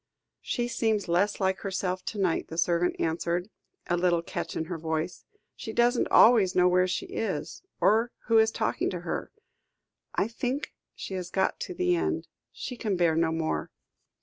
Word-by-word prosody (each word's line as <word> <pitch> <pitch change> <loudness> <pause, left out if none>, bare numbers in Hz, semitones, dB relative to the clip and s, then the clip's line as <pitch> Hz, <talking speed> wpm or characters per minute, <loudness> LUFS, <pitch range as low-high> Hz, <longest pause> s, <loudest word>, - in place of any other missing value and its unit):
"She 240 -2 -1
seems 220 -4 0
less 180 +5 +1
like 190 -1 +1
herself 185 -1 -2
to 215 - -4
night," 185 -4 0
the 160 - -8
servant 170 +1 +2
answered, 170 +4 -1 0.3
a 175 - +1
little 175 -1 +2
catch - - -5
in 160 - -2
her 170 0 -5
voice; 160 +2 -3 0.3
"she 220 - -6
doesn't 240 +1 +3
always 215 -6 +6
know 180 0 +5
where 180 0 +3
she 185 - -2
is, 185 -9 -4 0.2
or 225 +3 +3
who 225 -1 +5
is 220 0 +5
talking - - -1
to - - -4
her. - - -4 0.8
I 200 - +2
think 250 +5 -3 0.2
she - - -7
has 180 -2 -4
got 190 +1 0
to 365 - -5
the 360 0 +2
end. - - -1 0.2
She 250 - -6
can 210 -4 -1
bear 170 -2 +3
no 165 0 +2
more." 160 -1 -2
185 Hz, 175 wpm, -28 LUFS, 170-225 Hz, 0.8 s, always